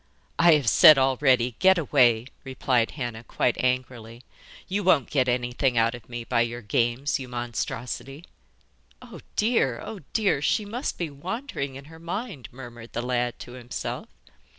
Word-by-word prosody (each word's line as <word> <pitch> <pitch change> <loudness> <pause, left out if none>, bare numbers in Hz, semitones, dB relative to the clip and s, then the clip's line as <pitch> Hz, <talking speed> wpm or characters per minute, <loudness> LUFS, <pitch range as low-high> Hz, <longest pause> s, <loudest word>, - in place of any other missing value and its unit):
'I 170 0 +7
have 145 -5 -1
said 150 +6 +8
already, 130 -2 +2
get 190 0 +5
away,' 125 -7 +3 0.2
replied 130 -3 0
Hannah, 120 -4 -5
quite 120 +1 0
angrily. 125 -2 -2 0.4
'You 200 +2 -2
won't 160 -8 +3
get 130 -3 +2
anything 125 +1 0
out 115 +1 +3
of 120 -2 -11
me 120 -1 -5
by 115 0 +1
your 120 0 -3
games, 120 +7 0
you 130 - -7
monstrosity.' 125 +4 -5 0.8
'Oh - - -11 0.2
dear, 210 - +1
oh 215 - -7
dear! 205 -10 +1
she 205 +7 +1
must 240 +7 -4
be 170 -4 -3
wandering 160 - -5
in 135 +1 -10
her 160 +2 -14
mind,' 170 - -6
murmured 120 -2 -11
the 120 - -3
lad 125 -1 -1
to - - -9
himself. 125 -1 -6
130 Hz, 155 wpm, -25 LUFS, 120-150 Hz, 0.8 s, said